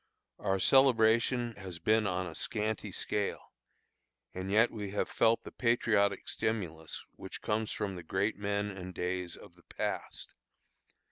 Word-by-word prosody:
Our 95 Hz, 0 st, +1 dB
celebration 120 Hz, -1 st, +4 dB
has 95 Hz, -3 st, -7 dB
been 110 Hz, +3 st, +3 dB
on 90 Hz, 0 st, -1 dB
a 85 Hz, -, -6 dB
scanty 105 Hz, +3 st, -2 dB
scale, 100 Hz, +2 st, -3 dB, 0.8 s
and 95 Hz, +1 st, -4 dB
yet 110 Hz, +4 st, +4 dB
we 105 Hz, -3 st, -5 dB
have 100 Hz, -, -1 dB
felt 115 Hz, +1 st, +3 dB
the -, -, -9 dB
patriotic 105 Hz, -4 st, +2 dB
stimulus 90 Hz, -8 st, -2 dB
which -, -, -8 dB
comes 110 Hz, 0 st, 0 dB
from 100 Hz, -2 st, -2 dB
the 90 Hz, -, -6 dB
great 95 Hz, +6 st, 0 dB
men 100 Hz, 0 st, -1 dB
and 90 Hz, -1 st, -7 dB
days 90 Hz, -1 st, -2 dB
of 100 Hz, -, -14 dB
the 90 Hz, -, -21 dB
past. -, -, -4 dB
100 Hz, 145 wpm, -32 LUFS, 95-110 Hz, 0.8 s, celebration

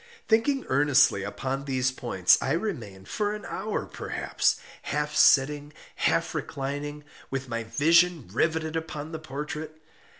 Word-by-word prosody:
Thinking 255 Hz, +5 st, +2 dB
earnestly 135 Hz, -6 st, +4 dB
upon 130 Hz, +8 st, -3 dB
these 130 Hz, -2 st, +1 dB
points, 105 Hz, -8 st, +3 dB
I 135 Hz, -, 0 dB
remained, 120 Hz, -, -4 dB
for 210 Hz, 0 st, -1 dB
an 210 Hz, -, -9 dB
hour 215 Hz, 0 st, -3 dB
perhaps, -, -, -1 dB, 0.3 s
half 150 Hz, +1 st, -2 dB
sitting, 145 Hz, +2 st, +4 dB, 0.2 s
half -, -, +1 dB
reclining, 145 Hz, +2 st, -4 dB, 0.3 s
with 135 Hz, -1 st, -3 dB
my 115 Hz, -1 st, -3 dB
vision 165 Hz, -, +3 dB
riveted 160 Hz, +4 st, 0 dB
upon 160 Hz, -1 st, -4 dB
the 160 Hz, -, -5 dB
portrait. 155 Hz, +1 st, -6 dB
145 Hz, 130 wpm, -27 LUFS, 130-160 Hz, 0.3 s, earnestly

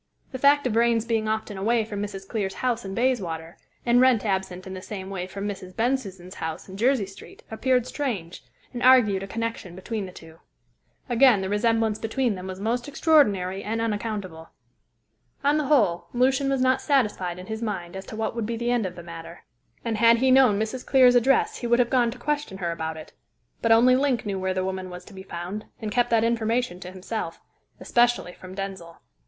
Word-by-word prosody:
The 260 Hz, -, -5 dB
fact 285 Hz, +1 st, +4 dB
of 250 Hz, -, 0 dB
Vrain's 230 Hz, 0 st, +2 dB
being 225 Hz, -2 st, 0 dB
often 215 Hz, -2 st, -2 dB
away 225 Hz, +2 st, +1 dB
from 205 Hz, -2 st, -5 dB
Mrs. 195 Hz, -2 st, -6 dB
Clear's 195 Hz, -4 st, -3 dB
house 245 Hz, -2 st, -1 dB
in 195 Hz, 0 st, -6 dB
Bayswater, 180 Hz, -10 st, -1 dB, 0.3 s
and 245 Hz, +1 st, +4 dB
Wrent 255 Hz, -4 st, +4 dB
absent 190 Hz, -2 st, -2 dB
in 190 Hz, -, -7 dB
the 185 Hz, -, -7 dB
same 195 Hz, -1 st, -7 dB
way 180 Hz, -2 st, -4 dB
from 200 Hz, +2 st, -5 dB
Mrs. 185 Hz, -2 st, -7 dB
Bensusan's 200 Hz, -7 st, -2 dB
house 160 Hz, +1 st, -5 dB
in 190 Hz, -, -9 dB
Jersey 240 Hz, +1 st, +2 dB
Street, 195 Hz, +1 st, -14 dB
appeared 250 Hz, +2 st, +1 dB
strange, 225 Hz, -, -4 dB, 0.3 s
and 245 Hz, -, -5 dB
argued 245 Hz, -7 st, +5 dB
a 195 Hz, -, -6 dB
connection 230 Hz, -4 st, -4 dB
between 200 Hz, +1 st, -4 dB
the -, -, -10 dB
two. 165 Hz, -2 st, -14 dB, 0.7 s
Again, 245 Hz, -4 st, +5 dB
the 190 Hz, -, -3 dB
resemblance 225 Hz, 0 st, +1 dB
between 235 Hz, +1 st, 0 dB
them 185 Hz, -1 st, -7 dB
was 185 Hz, 0 st, -6 dB
most 235 Hz, +5 st, -1 dB
extraordinary 205 Hz, -, +2 dB
and 225 Hz, +2 st, -2 dB
unaccountable. 205 Hz, -7 st, -3 dB, 0.9 s
On 290 Hz, +2 st, +3 dB
the 300 Hz, -, -1 dB
whole, 210 Hz, -, +2 dB
Lucian 265 Hz, +2 st, +2 dB
was 270 Hz, -1 st, +1 dB
not 260 Hz, +1 st, +3 dB
satisfied 210 Hz, -, 0 dB
in 180 Hz, -, -9 dB
his 220 Hz, +2 st, -5 dB
mind 190 Hz, -6 st, -4 dB
as 190 Hz, 0 st, -7 dB
to -, -, -7 dB
what 220 Hz, +1 st, -2 dB
would 230 Hz, -3 st, -2 dB
be 230 Hz, 0 st, -3 dB
the 240 Hz, +1 st, -1 dB
end 235 Hz, -5 st, +1 dB
of 180 Hz, -, -9 dB
the 175 Hz, -, -9 dB
matter, 170 Hz, 0 st, -10 dB, 0.4 s
and 225 Hz, -2 st, -1 dB
had 230 Hz, 0 st, +6 dB
he 260 Hz, +2 st, +3 dB
known 255 Hz, -6 st, +5 dB
Mrs. 220 Hz, +4 st, -3 dB
Clear's 255 Hz, -2 st, +5 dB
address 250 Hz, +2 st, +3 dB
he 240 Hz, -, -3 dB
would 235 Hz, 0 st, +4 dB
have 245 Hz, -1 st, +2 dB
gone 245 Hz, -3 st, +3 dB
to 240 Hz, -, -7 dB
question 295 Hz, -7 st, -2 dB
her 175 Hz, -3 st, -2 dB
about 160 Hz, -1 st, -4 dB
it. 155 Hz, -, -11 dB, 0.5 s
But 230 Hz, -, +2 dB
only 245 Hz, +3 st, +6 dB
Link 260 Hz, -4 st, +1 dB
knew 195 Hz, -2 st, -2 dB
where 185 Hz, 0 st, -1 dB
the 185 Hz, 0 st, -1 dB
woman 190 Hz, -1 st, -4 dB
was 180 Hz, 0 st, -9 dB
to 205 Hz, -, -14 dB
be 190 Hz, -, -9 dB
found, 190 Hz, +3 st, -6 dB
and 215 Hz, -2 st, -4 dB
kept 245 Hz, +2 st, +2 dB
that 225 Hz, -1 st, +3 dB
information 230 Hz, -3 st, 0 dB
to 180 Hz, 0 st, -8 dB
himself 185 Hz, -1 st, -5 dB, 0.4 s
especially 240 Hz, -7 st, +1 dB
from 185 Hz, +1 st, -11 dB
Denzil. 190 Hz, -4 st, -6 dB
220 Hz, 210 wpm, -25 LUFS, 190-245 Hz, 0.9 s, had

